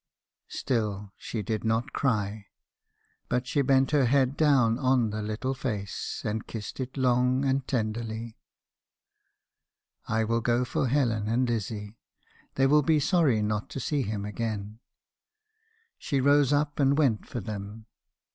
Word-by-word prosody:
" - - -65
Still 105 -5 -2
she 110 -3 -5
did 110 +2 -2
not 115 +1 0
cry. 105 -5 -1 0.8
But 125 +1 0
she 140 +3 +1
bent 135 0 +3
her 145 -3 +4
head 135 +1 +2
down 130 -7 +3
on 130 -4 +2
the 110 +1 -3
little 110 +5 -2
face, 105 -7 -4
and 110 +1 -2
kissed 110 +2 -7
it 130 +1 -5
long, 125 +1 +2
and 135 0 0
tenderly. 110 -1 -2
u 115 - -11 1.8
'I 110 - +2
will 115 +1 0
go 120 +2 +1
for 130 - -1
Helen 115 -6 +1
and 120 +3 +1
Lizzie. 110 -1 -4 0.6
They 135 - +3
will 150 +2 +5
be 155 +1 +3
sorry 140 - +2
not 105 +5 -2
to 140 - -5
see 145 +3 -1
him 105 -4 -3
again.' 105 0 -4 1.2
She 140 -3 -1
rose 140 +1 +4
up 145 0 0
and 140 0 +3
went 130 -9 +1
for 120 - -4
them. 105 +1 -7
120 Hz, 150 wpm, -28 LUFS, 110-135 Hz, 1.8 s, will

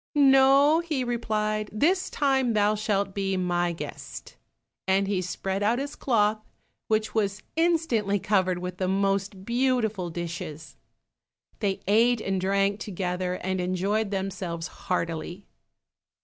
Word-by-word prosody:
"No, 275 +2 +6
he 315 -6 -2
replied, 215 -3 -1
this 345 - +1
time 265 -4 +1
thou 210 0 +3
shalt 200 -2 -1
be 195 -1 -1
my 175 -1 0
guest," 165 - -8 0.5
and 195 +1 +2
he 195 -2 0
spread 190 +2 -3
out 220 +4 +2
his 280 +2 -4
cloth, 215 -4 +1 0.5
which 215 0 0
was 205 -2 -1
instantly 315 - +1
covered 185 -2 +1
with 180 0 -5
the 185 - -1
most 195 0 0
beautiful 235 -6 0
dishes. 160 -4 -6 0.8
They 195 -2 -1
ate 230 +4 +4
and 195 -3 -2
drank 195 +2 +1
together, 180 -2 -3
and 185 0 -1
enjoyed 195 +4 0
themselves 190 -4 -3 0.2
heartily. 175 +1 -2
200 Hz, 125 wpm, -26 LUFS, 185-230 Hz, 0.8 s, No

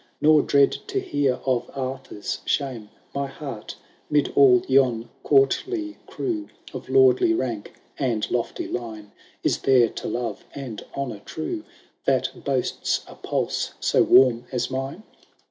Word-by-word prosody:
Nor 155 0 +6
dread 140 -1 +4 0.2
to 395 - -1
hear 145 - 0
of 130 -3 0
Arthur's 130 -2 -4
shame. 125 -7 -2 0.2
My 140 0 -1
heart 135 -5 -7 0.2
— - - -35
'mid 150 -1 +2
all 125 -3 +6
yon 130 -4 +3
courtly 315 - +2
crew, 320 -4 -3 0.2
Of - - -7
lordly 385 -3 +5
rank 115 - -3 0.3
and 120 -6 0
lofty 120 -1 -2
line, 110 -4 -6 0.3
Is - - +1
there 125 -4 +4
to - - -6
love 120 +1 -3
and 130 -6 -6
honour 125 -7 -3
true, 320 - -5 0.4
That - - 0
boasts 135 -3 -1
a - - -11
pulse - - -2
so - - +3
warm 125 -2 +5
as 125 0 -2
mine 135 +9 -4
135 Hz, 140 wpm, -24 LUFS, 120-150 Hz, 0.4 s, Nor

